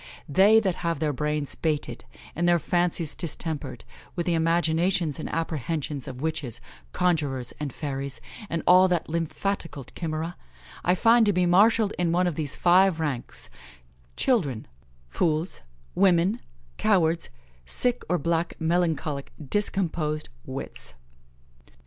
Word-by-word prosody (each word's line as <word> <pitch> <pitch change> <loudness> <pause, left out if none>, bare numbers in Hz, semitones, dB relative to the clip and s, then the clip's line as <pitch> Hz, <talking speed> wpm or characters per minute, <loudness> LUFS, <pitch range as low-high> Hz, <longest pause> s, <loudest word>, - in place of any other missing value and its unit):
They 195 +9 +6
that 190 -5 -1
have 170 -2 -1
their 150 0 0
brains 150 +1 -2
baited, 155 -3 -2 0.3
and 175 +2 +1
their 175 - +5
fancies 175 -1 0
distempered, 150 -7 -4 0.3
with 175 -2 -2
the 175 - +1
imaginations 165 0 +1
and - - -4
apprehensions 155 -3 -3
of 125 0 -7
witches, 155 -7 -3 0.3
conjurors, 145 -8 0
and 150 -2 -3
fairies, 135 -1 -4 0.3
and 165 - -2
all 185 +1 +7
that 175 -4 -1
lymphatical 165 -1 -3
chimera, 160 +5 -5 0.5
I 180 - +3
find 230 +4 +5
to 205 - +3
be 180 0 +2
marshalled 205 +4 +4
in 175 -2 +1
one 180 +2 +2
of 175 - 0
these 150 -2 -2
five 180 -1 +4
ranks: 145 -6 -3 0.7
Children, 145 - +1 0.4
fools, 155 - -1 0.3
women, 190 +3 +3 0.4
cowards, 170 -5 +2 0.4
sick 245 - +4
or 180 - +2
black 170 +2 -1
melancholic 160 -4 0 0.2
discomposed 165 -7 0 0.2
wits." 130 - -6
165 Hz, 125 wpm, -26 LUFS, 150-180 Hz, 0.7 s, all